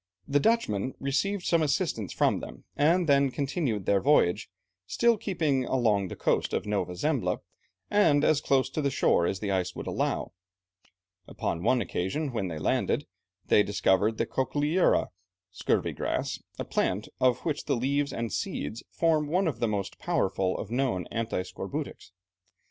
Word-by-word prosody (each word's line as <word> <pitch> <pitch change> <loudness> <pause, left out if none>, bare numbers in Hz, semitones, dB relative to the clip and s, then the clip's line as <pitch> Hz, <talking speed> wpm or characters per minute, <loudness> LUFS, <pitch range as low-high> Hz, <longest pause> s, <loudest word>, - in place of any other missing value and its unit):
The 145 +1 +3
Dutchmen 135 - +1
received 180 +8 -1
some 170 -1 +3
assistance 145 - 0
from - - +2
them, - - -10
and 165 +4 +3
then 140 -1 +4
continued 135 - -2
their 100 -1 +3
voyage, 135 -11 +3 0.4
still 235 - +3
keeping 165 - 0
along 110 -7 +1
the - - -7
coast - - 0
of - - -1
Nova 95 -4 -2
Zembla, - - 0 0.5
and 155 -9 +3
as 150 -2 +3
close 135 -1 +1
in 145 -3 +1
shore 85 -9 +2
as 95 - -3
the 100 -2 -1
ice 90 -1 -1
would - - -6
allow. - - -1 1.0
Upon 85 - -3
one 120 +5 +2
occasion 135 - -2
when 105 -5 -1
they 80 -3 -5
landed, - - 0 0.4
they - - +5
discovered 105 +2 +2
the - - +1
cochlearia 150 +6 +1 0.4
(scurvy 90 - 0
grass), - - -2 0.2
a - - -4
plant 100 +4 -1
of 125 -1 +3
which 150 -3 -2
the 140 - +1
leaves 140 +4 0
and 115 -1 -3
seeds 110 +11 -3
form 160 -3 +1
one 180 +4 +1
of 140 -8 -2
the 115 - +1
most 100 -3 -3
powerful 95 -1 0
of 110 - -6
known 120 -8 0
anti 115 -5 -2
scorbutics. - - -6
130 Hz, 160 wpm, -28 LUFS, 100-150 Hz, 1.0 s, they